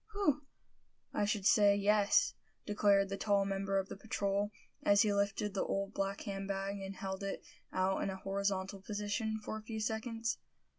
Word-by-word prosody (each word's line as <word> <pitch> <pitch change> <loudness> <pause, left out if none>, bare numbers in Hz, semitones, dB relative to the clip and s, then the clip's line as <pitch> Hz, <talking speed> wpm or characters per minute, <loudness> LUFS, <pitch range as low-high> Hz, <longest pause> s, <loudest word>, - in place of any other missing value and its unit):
"Whew! 295 -8 +1 0.7
I 205 - +2
should 205 -1 -1
say, 205 -1 +6
yes!" 205 0 +4 0.3
declared 200 -1 +3
the 195 - -3
tall 200 -1 +2
member 195 0 0
of 190 -1 0
the - - -6
patrol, 200 0 -1 0.3
as 205 +1 +5
he 210 -2 +2
lifted 200 0 0
the 195 - 0
old 195 +1 -2
black 195 0 -2
hand 195 -1 -4
bag, 195 0 -2
and 195 0 -5
held 190 0 -4
it 195 0 -4 0.3
out 185 +1 +1
in - - 0
a 190 - -3
horizontal 195 0 -2
position 210 +2 -2
for 220 - -4
a - - -14
few 220 0 -5
seconds. 225 +1 -2
200 Hz, 180 wpm, -34 LUFS, 195-210 Hz, 0.7 s, say